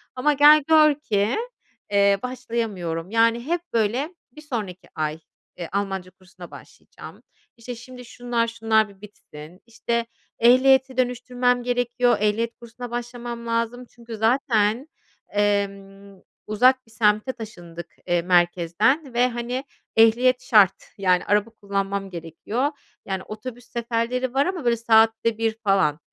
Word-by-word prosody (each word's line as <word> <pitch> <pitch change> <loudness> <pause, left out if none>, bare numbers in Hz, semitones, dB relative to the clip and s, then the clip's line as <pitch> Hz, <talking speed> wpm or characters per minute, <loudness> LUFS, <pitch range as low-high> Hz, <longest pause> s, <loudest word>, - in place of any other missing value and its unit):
Ama 285 +4 +2
gel 295 +1 +7
gör 310 -2 +6
ki, 215 -6 -1 0.5
eee, 200 0 +4
başlayamıyorum, 215 -9 -4
yani 230 +1 +2
hep 340 +3 -1
böyle 240 - 0 0.2
bir 305 - -13
sonraki 200 - -6
ay, 155 0 -2 0.4
eee, 170 -2 -6
Almanca 195 -2 -3
kursuna 180 -2 -15
başlayacağım, - - -14 0.3
işte, 240 +1 -7
şimdi 250 +1 -12
şunlar, 240 -1 -2
şunlar 225 -2 +1
bir 195 -1 -19
bitsin, 175 -4 -13
işte, 235 0 -2 0.3
ehliyeti 260 +2 +4
dönüştürmem 245 0 0
gerekiyor, 245 0 +1
ehliyet 215 +3 0
kursuna 235 +1 -9
başlamam 240 -1 -6
lazım 230 +2 -2
çünkü 235 -2 -10
zaten, 225 +1 +1 0.5
emm, 200 -1 -2 0.3
uzak 255 +5 +3
bir - - -21
semte 215 +3 +1
taşındık, 175 -7 -10
eee, 175 -1 +2
merkezden 180 - +1
ve, 245 +1 +3
hani, 245 +2 -4 0.3
ehliyet 245 +3 +4
şart, 210 -7 +5 0.2
yani, 185 -2 +2
araba 205 +2 +1
kullanmam 200 -2 -3
gerekiyor, 185 - -3 0.3
yani, 190 -1 -4
otobüs 235 +3 -9
seferleri 240 +1 -2
var 275 +1 +2
ama 355 -7 -3
böyle 235 -1 +2
saatte 225 0 +3
1 225 -1 -1
falan. 190 -7 +2
230 Hz, 130 wpm, -23 LUFS, 200-245 Hz, 0.5 s, gel